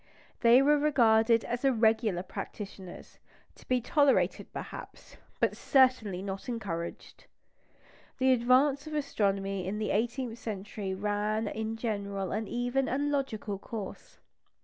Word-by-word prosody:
They 240 Hz, +2 st, +6 dB
were 295 Hz, +1 st, +4 dB
regarded 230 Hz, -6 st, +4 dB
as 240 Hz, +2 st, -3 dB
irregular 220 Hz, -7 st, +2 dB
practitioners, 190 Hz, -1 st, -8 dB, 0.3 s
to -, -, -19 dB
be 255 Hz, 0 st, +2 dB
tolerated 285 Hz, +3 st, +2 dB
perhaps, -, -, -9 dB, 0.2 s
but -, -, +1 dB
certainly 250 Hz, -9 st, +2 dB
not 195 Hz, +3 st, -5 dB
encouraged. 190 Hz, -8 st, -6 dB, 0.9 s
The 260 Hz, 0 st, +4 dB
advance 265 Hz, +4 st, +3 dB
of 310 Hz, -, -5 dB
astronomy 195 Hz, -9 st, -1 dB
in 205 Hz, +2 st, -2 dB
the 215 Hz, 0 st, -1 dB
eighteenth 235 Hz, +2 st, -1 dB
century 200 Hz, -2 st, -5 dB
ran 210 Hz, +2 st, -1 dB
in 220 Hz, +2 st, -3 dB
general 200 Hz, -4 st, -3 dB
an 215 Hz, +1 st, -2 dB
even 245 Hz, +2 st, -1 dB
and 285 Hz, +3 st, 0 dB
logical 220 Hz, -8 st, -2 dB
course. 210 Hz, -2 st, -8 dB
225 Hz, 125 wpm, -30 LUFS, 200-255 Hz, 0.9 s, They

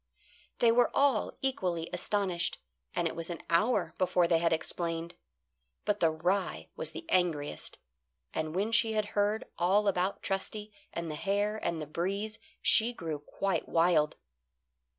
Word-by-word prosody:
They 235 Hz, -1 st, +5 dB
were 240 Hz, +1 st, +4 dB
all 275 Hz, -6 st, +2 dB
equally 180 Hz, -11 st, 0 dB
astonished, 180 Hz, -1 st, 0 dB, 0.4 s
and -, -, +2 dB
it -, -, -4 dB
was 165 Hz, 0 st, -3 dB
an 170 Hz, -, -5 dB
hour 175 Hz, -2 st, +2 dB
before 180 Hz, -1 st, +3 dB
they 165 Hz, -1 st, +4 dB
had 165 Hz, 0 st, +2 dB
explained. 165 Hz, +1 st, -2 dB, 0.7 s
But 210 Hz, 0 st, +1 dB
the 165 Hz, -, +4 dB
rye 180 Hz, +5 st, -1 dB
was -, -, -1 dB
the 330 Hz, -, -7 dB
angriest, 160 Hz, -, 0 dB, 0.6 s
and 155 Hz, +1 st, -2 dB
when 205 Hz, +4 st, 0 dB
she 230 Hz, -1 st, +4 dB
had 215 Hz, -1 st, 0 dB
heard 205 Hz, +1 st, +1 dB
all 195 Hz, +4 st, +3 dB
about 190 Hz, 0 st, 0 dB
Trusty 210 Hz, +2 st, -3 dB, 0.2 s
and 170 Hz, -2 st, -4 dB
the -, -, -3 dB
hare 205 Hz, +5 st, 0 dB
and 170 Hz, -6 st, -2 dB
the 155 Hz, -, -4 dB
breeze 195 Hz, +8 st, -2 dB, 0.2 s
she 235 Hz, +2 st, +4 dB
grew 160 Hz, -8 st, -4 dB
quite 170 Hz, +3 st, -2 dB
wild. 165 Hz, -3 st, +3 dB
185 Hz, 150 wpm, -31 LUFS, 165-210 Hz, 0.7 s, They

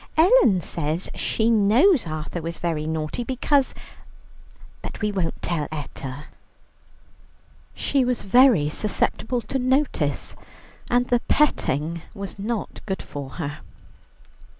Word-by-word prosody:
"Ellen 320 Hz, -, +5 dB
says 160 Hz, +2 st, -3 dB
she 225 Hz, +1 st, 0 dB
knows 230 Hz, -, +4 dB
Arthur 155 Hz, +2 st, -4 dB
was 165 Hz, +1 st, -5 dB
very 160 Hz, -3 st, -2 dB
naughty, 160 Hz, +7 st, -2 dB
because... 265 Hz, +2 st, +1 dB, 1.1 s
But -, -, -7 dB
we 210 Hz, -1 st, 0 dB
won't 185 Hz, -5 st, -2 dB
tell 165 Hz, -4 st, -1 dB
Etta." 145 Hz, -2 st, -6 dB, 1.5 s
She 275 Hz, -2 st, +1 dB
was 250 Hz, -1 st, -1 dB
very 230 Hz, -, +5 dB
susceptible 215 Hz, +7 st, -1 dB
to 270 Hz, -, -3 dB
notice, 255 Hz, -, 0 dB, 0.5 s
and 245 Hz, 0 st, +2 dB
the 245 Hz, -, +3 dB
petting 165 Hz, -, +1 dB
was 200 Hz, 0 st, -7 dB
not 220 Hz, +2 st, -4 dB
good 190 Hz, -1 st, -3 dB
for 140 Hz, -2 st, -7 dB
her. 150 Hz, -3 st, -5 dB
200 Hz, 115 wpm, -24 LUFS, 155-245 Hz, 1.5 s, Ellen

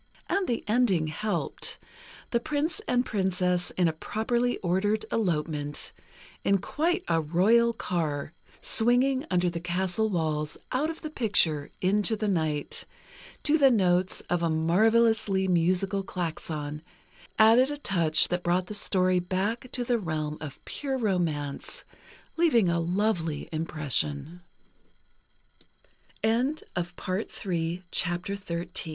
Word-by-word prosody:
And 390 Hz, -1 st, 0 dB
the 235 Hz, -, -1 dB
ending 210 Hz, -9 st, +2 dB
helped: 210 Hz, +7 st, -2 dB, 0.5 s
the 235 Hz, -, +2 dB
Prince 310 Hz, -, -2 dB
and 250 Hz, 0 st, +2 dB
Princess, 180 Hz, -3 st, 0 dB
in 180 Hz, -2 st, +4 dB
a 160 Hz, -, 0 dB
properly 235 Hz, +8 st, -1 dB
ordered 205 Hz, +5 st, +1 dB
elopement, 150 Hz, -7 st, -1 dB, 0.5 s
in 200 Hz, -, +3 dB
quite 345 Hz, -, -1 dB
a 165 Hz, -, +2 dB
royal 205 Hz, +10 st, +4 dB
car, 160 Hz, -8 st, -2 dB, 0.3 s
swinging 255 Hz, +4 st, +2 dB
under 180 Hz, -1 st, +2 dB
the 170 Hz, -1 st, -2 dB
castle 180 Hz, +4 st, -1 dB
walls, 155 Hz, -4 st, -1 dB
out 285 Hz, +5 st, +1 dB
of 325 Hz, -, -6 dB
the 310 Hz, -, -6 dB
picture, 170 Hz, -, +2 dB
into 205 Hz, +4 st, +2 dB
the 215 Hz, 0 st, -2 dB
night, 155 Hz, -6 st, 0 dB, 0.6 s
to 310 Hz, +2 st, +3 dB
the 275 Hz, -2 st, +7 dB
notes 185 Hz, -5 st, +2 dB
of 175 Hz, -1 st, -1 dB
a 170 Hz, -, +1 dB
marvelously 195 Hz, +4 st, +3 dB
musical 185 Hz, +3 st, +2 dB
klaxon, 155 Hz, -5 st, -4 dB, 0.6 s
added 230 Hz, +5 st, +6 dB
a 290 Hz, -, -3 dB
touch 170 Hz, -, +3 dB
that 180 Hz, 0 st, -1 dB
brought 180 Hz, +1 st, +1 dB
the 210 Hz, -, -7 dB
story 185 Hz, -3 st, +2 dB
back 200 Hz, +7 st, -2 dB
to 245 Hz, -, -2 dB
the 240 Hz, -1 st, +1 dB
realm 155 Hz, -5 st, -3 dB
of 150 Hz, -4 st, -8 dB
pure 270 Hz, -2 st, -3 dB
romance, 175 Hz, -, -1 dB, 0.5 s
leaving 240 Hz, -, +4 dB
a 170 Hz, 0 st, +1 dB
lov 180 Hz, +3 st, +1 dB
190 Hz, 115 wpm, -27 LUFS, 170-235 Hz, 0.6 s, the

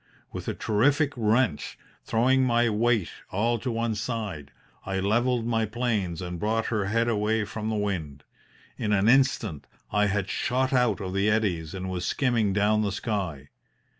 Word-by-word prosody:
With -, -, -7 dB
a -, -, -2 dB
terrific 145 Hz, +7 st, +2 dB
wrench, 115 Hz, -, +1 dB, 0.3 s
throwing 130 Hz, +4 st, +3 dB
my 120 Hz, -2 st, +2 dB
weight 110 Hz, -2 st, +1 dB, 0.2 s
all 115 Hz, +4 st, 0 dB
to 125 Hz, -, -3 dB
one 115 Hz, -1 st, -1 dB
side, 105 Hz, -, -4 dB, 0.3 s
I 95 Hz, 0 st, -2 dB
levelled 115 Hz, +4 st, +1 dB
my 115 Hz, -2 st, 0 dB
planes 105 Hz, -7 st, -2 dB
and 90 Hz, -1 st, -5 dB
brought 110 Hz, +3 st, 0 dB
her 105 Hz, -3 st, 0 dB
head 115 Hz, +4 st, +1 dB
away 110 Hz, -1 st, +1 dB
from 110 Hz, +1 st, -4 dB
the 110 Hz, -, -1 dB
wind. 85 Hz, -9 st, -3 dB, 0.6 s
In 105 Hz, -1 st, 0 dB
an 100 Hz, +1 st, +3 dB
instant 120 Hz, -, +2 dB, 0.2 s
I 105 Hz, 0 st, +3 dB
had 100 Hz, -1 st, -1 dB
shot 130 Hz, +6 st, 0 dB
out 120 Hz, -6 st, +2 dB
of 95 Hz, -1 st, -4 dB
the 100 Hz, +2 st, +2 dB
eddies 95 Hz, -7 st, 0 dB
and 95 Hz, 0 st, -4 dB
was 90 Hz, -1 st, -3 dB
skimming 115 Hz, -3 st, +1 dB
down 105 Hz, +2 st, +2 dB
the 105 Hz, -2 st, 0 dB
sky. 95 Hz, -, -3 dB
105 Hz, 165 wpm, -26 LUFS, 95-120 Hz, 0.6 s, throwing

